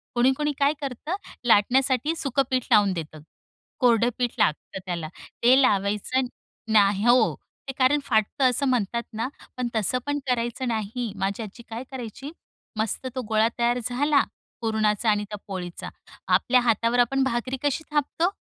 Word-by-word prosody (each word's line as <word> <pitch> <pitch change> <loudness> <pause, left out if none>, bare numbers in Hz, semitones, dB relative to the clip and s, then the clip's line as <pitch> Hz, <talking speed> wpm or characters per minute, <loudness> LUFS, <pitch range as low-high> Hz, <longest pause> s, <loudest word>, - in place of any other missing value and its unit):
कोणी-कोणी 265 +5 +2
काय 285 +1 +3
करतं? 280 +5 -4 0.3
लाटण्यासाठी 260 +7 +3
सुखं 275 -3 +1
पीठ 255 -2 0
लावून 205 -3 +5
देतं. 155 -3 -6 0.6
कोरडं 240 -2 +4
पीठ 245 -2 -1
लागतं 155 +5 0
त्याला, 170 -3 -3 0.4
ते 255 +3 +6
लावायचं, 210 +4 +1 0.5
नाह 205 0 +4
हो. 240 -1 +4 0.3
ते 270 - -2
कारण 270 +3 +4
फाटत 220 0 0
असं 260 +2 +3
म्हणतात 235 -2 0
ना, 225 +3 -2 0.3
पण 250 -1 -1
तसं 220 +3 +1
पण 290 0 -1
करायचं 240 +1 -1
नाही. 225 +1 -2
माझी 200 +3 -1
आजी 220 +3 -10
काय 230 +2 -5
करायची? 265 +3 -7 0.5
मस्त 220 +4 -1
तो 260 - -1
गोळा 220 0 +3
तयार 240 +1 +2
झाला, 280 +5 +2 0.4
पुरणाचा 220 -1 +1
आणि 210 -1 +2
त्या 210 - -5
पोळीचा, 180 -3 -6 0.4
आपल्या 250 -1 +3
हातावर 230 +1 +2
आपण 270 +3 +3
भाकरी 255 +1 -1
कशी 290 +2 0
थापतो. 305 +5 +1
240 Hz, 150 wpm, -25 LUFS, 215-265 Hz, 0.6 s, ते